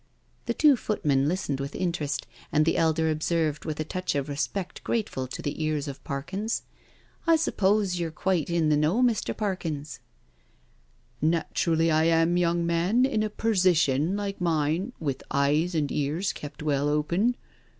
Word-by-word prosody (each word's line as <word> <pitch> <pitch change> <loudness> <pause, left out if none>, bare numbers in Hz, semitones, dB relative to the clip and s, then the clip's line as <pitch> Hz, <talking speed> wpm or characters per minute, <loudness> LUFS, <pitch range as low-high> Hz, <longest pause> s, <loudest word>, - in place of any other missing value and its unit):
The - - 0
two 295 -3 +6
footmen 145 -12 +1
listened 155 -5 -1
with 140 +1 -5
interest, 155 -5 -2 0.3
and 155 0 +3
the 165 - +2
elder 160 0 +2
observed, 155 -1 -1
with 155 -2 -4
a - - +1
touch 185 +2 -3
of 140 0 -1
respect 180 +6 -3
grateful 205 - -2
to - - -7
the 145 +2 -3
ears 155 -1 -1
of 140 -1 -7
Parkins: 190 - -3 0.3
" - - -32
I 330 - +6
suppose 200 - +1
you're 170 -1 -1
quite 170 0 -1
in 170 -2 +2
the 150 - +4
know, 160 +12 +2
Mr. 235 -3 +1
Parkins?" 155 - -3 0.6
" - - -37 0.5
Naturally 165 +1 +1
I 155 +1 +3
am, 165 +1 +3
young 170 -1 +1
man, 175 +9 +2
in 245 -5 0
a 215 - 0
persition 180 -7 +2
like 200 -2 -4
mine, 165 +5 0
with 140 -5 -2
eyes 150 +5 +1
and 150 -3 0
ears 150 +7 -1
kept 150 0 -8
well 145 -1 +1
open. 170 +11 +1
165 Hz, 165 wpm, -27 LUFS, 150-190 Hz, 0.6 s, two